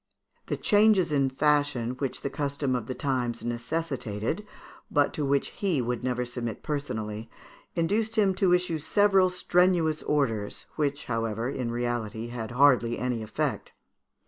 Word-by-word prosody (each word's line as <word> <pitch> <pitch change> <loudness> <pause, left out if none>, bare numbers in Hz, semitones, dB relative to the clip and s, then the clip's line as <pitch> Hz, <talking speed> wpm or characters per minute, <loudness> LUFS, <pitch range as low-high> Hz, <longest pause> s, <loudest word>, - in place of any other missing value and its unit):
The - - -1
changes 205 -5 +4
in 140 -2 +2
fashion 145 -3 +1
which 130 +1 -4
the 140 - -2
custom 140 -1 -1
of 120 -3 -3
the 130 - -4
times 125 -4 -2
necessitated, 120 - -2 0.5
but 145 -1 +2
to 150 - -2
which 140 0 +1
he 185 -8 -1
would 125 0 -2
never 125 -1 -1
submit 120 -2 -5
personally, 110 -7 -4 0.5
induced 215 +6 0
him 200 -4 +3
to 185 -1 +2
issue 180 -3 +1
several 195 +3 +4
strenuous 180 -3 +2
orders, 115 -9 -1
which, 145 -1 -1
however, 115 +1 -2
in 125 -4 -3
reality 120 -2 -3
had 120 -2 -5
hardly 125 -2 +4
any 125 -2 -1
effect. 110 0 -3
135 Hz, 145 wpm, -27 LUFS, 120-160 Hz, 0.5 s, changes